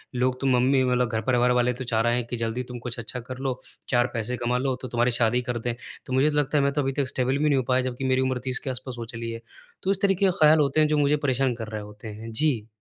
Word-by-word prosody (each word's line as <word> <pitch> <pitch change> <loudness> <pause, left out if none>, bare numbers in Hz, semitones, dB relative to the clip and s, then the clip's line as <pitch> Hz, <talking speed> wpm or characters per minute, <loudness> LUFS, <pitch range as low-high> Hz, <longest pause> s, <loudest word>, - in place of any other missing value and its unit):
लोग 125 +1 0
तो 135 - +1
मम्मी 130 +1 +3
मतलब 125 -1 +1
घर-परिवार 120 +3 +2
वाले 125 0 +2
तो 130 +2 -6
चाह 115 -2 +1
रहे 120 +1 +2
हैं 125 -1 -1
कि 120 - -4
जल्दी 115 +2 -2
तुम 120 - -6
कुछ 120 0 -5
अच्छा 120 +2 -4
कर 125 +2 -8
लो, 130 -1 -3 0.3
चार 120 -1 +3
पैसे 120 +1 -2
कमा 120 +1 0
लो 130 0 0
तो 130 - -5
तुम्हारी 120 +1 +1
शादी 120 +1 +2
कर 125 -1 -3
दें। 120 +1 -2 0.3
तो 130 - -5
मुझे 135 +4 +4
लगता 150 0 +1
है 140 - +3
मैं 140 - +2
तो 145 - +1
अभी 135 - 0
तक 135 - -1
स्टेबल 130 +1 0
भी 150 - -1
नहीं 140 - +3
हो 130 - +1
पाया 130 0 +3
जबकि 125 +2 -5
मेरी 130 0 +2
उम्र 130 -1 0
30 130 -1 -1
के - - -3
आसपास 130 0 -5
हो 115 - -4
चली 115 0 -4
है। 115 - -7 0.4
तो 190 - +2
इस 195 0 -2
तरीके 195 -1 +2
के 190 - +4
ख्याल 155 0 +6
होते 145 0 +2
हैं 155 - +5
जो 150 - +1
मुझे 145 0 +3
परेशान 130 -1 +1
कर 115 -2 -6
रहे 110 -1 -5
होते 105 +1 -11
हैं। 110 +2 -8
जी। 115 -3 +1
125 Hz, 295 wpm, -25 LUFS, 120-135 Hz, 0.4 s, ख्याल